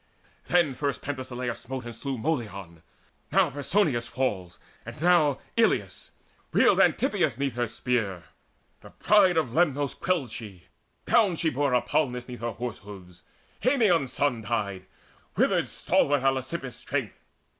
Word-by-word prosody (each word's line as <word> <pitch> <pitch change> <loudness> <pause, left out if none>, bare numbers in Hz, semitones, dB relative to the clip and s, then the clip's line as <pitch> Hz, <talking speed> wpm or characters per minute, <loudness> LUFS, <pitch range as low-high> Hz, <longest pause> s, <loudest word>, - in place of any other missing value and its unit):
Then 170 -6 +3
first 140 +1 -3
Penthesileia 130 -3 -4
smote 130 0 -7
and 120 -1 -7
slew 135 -2 -4
Molion; 105 - -4 0.5
now - - +3
Persinous 145 - 0
falls, 100 -11 -3 0.3
and - - -9
now 160 -4 +4 0.2
Eilissus; - - +1 0.4
reeled - - +4
Antitheus 115 - +2
'neath 140 -2 -1
her 120 0 -1
spear 110 -5 -2 0.6
The - - -14
pride 195 -5 +3
of 155 -6 +1
Lernus 145 -3 +1
quelled 170 -10 -1
she: 100 -7 -9 0.4
down 205 -7 +3
she 160 0 0
bore 140 0 0
Hippalmus 125 0 0
'neath 125 -2 -8
her 120 0 -3
horse 120 -2 -5
hoofs; 90 -3 -12 0.4
Haemon's 210 - +2
son 135 -5 0
Died; 100 -4 -3 0.5
withered - - +2
stalwart 145 -2 +1
Elasippus' 135 0 -2
strength. - - -4
130 Hz, 135 wpm, -27 LUFS, 115-145 Hz, 0.6 s, now